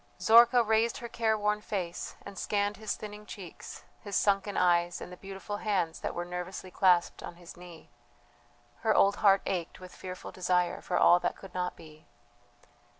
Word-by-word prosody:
Zorka 235 +2 +6
raised 225 +3 +2
her 240 -4 -6
careworn 215 -2 0
face 185 -5 -4
and 200 - -9
scanned 205 +2 -1
his 215 -1 -3
thinning 210 0 -9
cheeks, 185 -5 -10 0.2
his 205 -2 -6
sunken 200 0 +1
eyes, 175 -1 +2
and - - -9
the - - -8
beautiful 195 +2 -7
hands 190 -7 -1
that - - -4
were 175 - -3
nervously 180 +1 -6
clasped 180 -2 +3
on 175 - -8
his 175 -1 -13
knee. 175 -2 -13 0.9
Her - - +1
old 200 +1 +4
heart 195 -1 +4
ached 175 -3 -3
with 185 0 -11
fearful 185 -1 -8
desire 180 -1 0
for - - -2
all 175 - +6
that - - -2
could 195 - -12
not 180 0 -2
be. 155 -1 -15
195 Hz, 170 wpm, -30 LUFS, 180-210 Hz, 0.9 s, Zorka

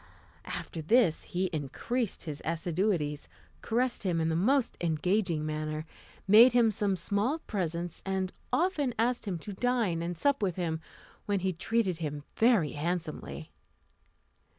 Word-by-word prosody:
After 160 - -5
this 180 0 +3
he 180 +2 -1
increased 195 - -2
his 150 -3 -5
assiduities, 165 -2 -1 0.3
caressed 245 +2 0
him 180 -4 0
in 160 0 +1
the 160 - 0
most 250 +9 +2
engaging 170 0 +1
manner, 155 0 -3 0.4
made 230 +5 +8
him 235 -2 +5
some 205 -1 +1
small 205 - 0
presents, 175 - -3
and 190 -1 -2 0.2
often 300 -8 +1
asked 240 +2 +1
him 185 -3 -1
to 200 +5 -7
dine 225 -7 0
and 170 0 -3
sup 280 - +2
with 185 -4 0
him, 160 -3 -2 0.5
when 200 -2 +1
he 190 0 0
treated 190 0 0
him 150 -3 -4
very 220 - +4
handsomely. 165 +1 -4
185 Hz, 140 wpm, -30 LUFS, 160-225 Hz, 0.5 s, made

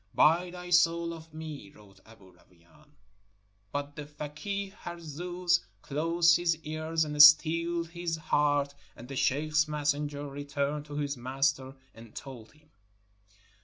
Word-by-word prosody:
"Buy 170 +4 +4
thy 180 0 -9
soul 170 -1 +3
of 160 -1 -12
me!" 155 -8 -8
wrote 100 -2 -19
Aboo 100 -4 -17
Rawain; 90 - -25 0.8
but 145 0 -4
the 150 -1 -7
fakeeh 150 +7 -5
Harzooz 175 +1 -2 0.2
closed 165 +4 +3
his 170 -2 +1
ears 155 +1 -1
and 150 -1 +3
steeled 165 +3 +6
his 170 -1 -3
heart, 145 -2 +1 0.2
and 120 - -11
the 135 - -7
sheikh's 150 +3 +1
messenger 145 -1 -2
returned 145 +1 -3
to 145 -1 -9
his 145 -2 -2
master 135 +1 -1 0.2
and 115 -1 -15
told 125 -5 -10
him. 150 0 -27
150 Hz, 130 wpm, -29 LUFS, 140-165 Hz, 0.8 s, steeled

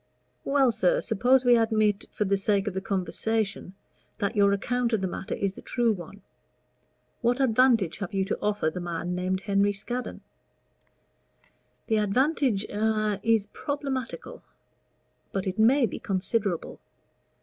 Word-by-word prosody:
"Well, 275 -3 +3
sir, 185 -5 +2
suppose 245 +4 +2
we 245 -1 +6
admit, 215 -2 +1
for 210 - -1
the 200 0 +2
sake 200 +1 +1
of 205 - -1
the 190 - -3
conversation, 200 0 -2 0.4
that 205 +1 -2
your 200 -1 +4
account 240 +4 0
of 215 - +1
the 190 - 0
matter 185 - -4
is 195 -1 -1
the - - -11
true 240 -2 +1
one: 195 +2 -10 1.0
what 245 +2 +1
advantage 235 -7 +3
have 195 -4 -4
you 195 -1 0
to - - -3
offer 205 -6 0
the 180 - -5
man 175 +1 -3
named 185 +1 -1
Henry 200 0 +2
Scaddon?" 240 +4 -5 1.6
"The 220 - +1
advantage 240 +1 +1
a 215 -1 0
is 225 -2 +2
problematical; 275 -4 -4 0.9
but 195 -1 -2
it 190 +2 -3
may 245 +4 +5
be 205 - -5
considerable. 195 -1 -2
210 Hz, 145 wpm, -27 LUFS, 195-235 Hz, 1.6 s, we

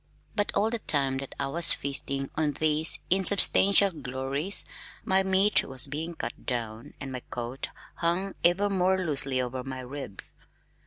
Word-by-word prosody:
But 205 -1 -1
all 215 +3 +1
the 235 - -3
time 135 -7 +2
that 135 - -9
I 140 - -1
was 165 +5 +6
feasting 135 0 -4
on 150 -2 -1
these 155 +2 +1
insubstantial 195 +1 +6
glories, 140 +4 -3 0.4
my 190 0 +2
meat 190 +1 +3
was 130 -1 0
being 155 +4 -6
cut - - -8
down 115 -3 -5
and 135 - -7
my 130 - -5
coat 120 +2 -6 0.3
hung 180 +3 -2
ever 175 +4 +2
more 190 -1 0
loosely 140 -7 0
over 125 0 -4
my 130 -1 -7
ribs. 130 -6 -5
150 Hz, 155 wpm, -26 LUFS, 135-190 Hz, 0.4 s, was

